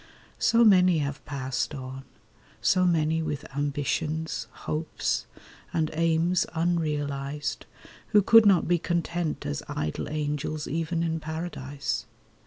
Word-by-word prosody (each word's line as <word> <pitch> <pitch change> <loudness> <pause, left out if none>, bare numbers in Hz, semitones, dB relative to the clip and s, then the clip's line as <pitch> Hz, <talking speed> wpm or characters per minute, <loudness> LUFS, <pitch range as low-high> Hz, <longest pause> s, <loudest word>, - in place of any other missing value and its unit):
So 230 +1 +4
many 185 -4 +6
have 140 -2 -3
passed 135 +1 -2
on— 130 0 -7 0.5
So 185 0 +3
many 160 -2 +2
with 150 -3 -3
ambitions, 145 -1 -1
hopes, 155 +4 -2 0.4
and 155 -2 0
aims 165 +2 +2
Unrealised, 150 -5 -1 0.4
who 205 -1 +4
could 225 +1 +7
not 185 -4 +4
be 175 0 +3
content 170 -1 -2
As 70 -1 -2
idle 75 0 -3
angels 150 0 -2
even 165 +2 -1
in 165 -1 -1
paradise. 155 -3 -4
155 Hz, 115 wpm, -27 LUFS, 145-170 Hz, 0.5 s, could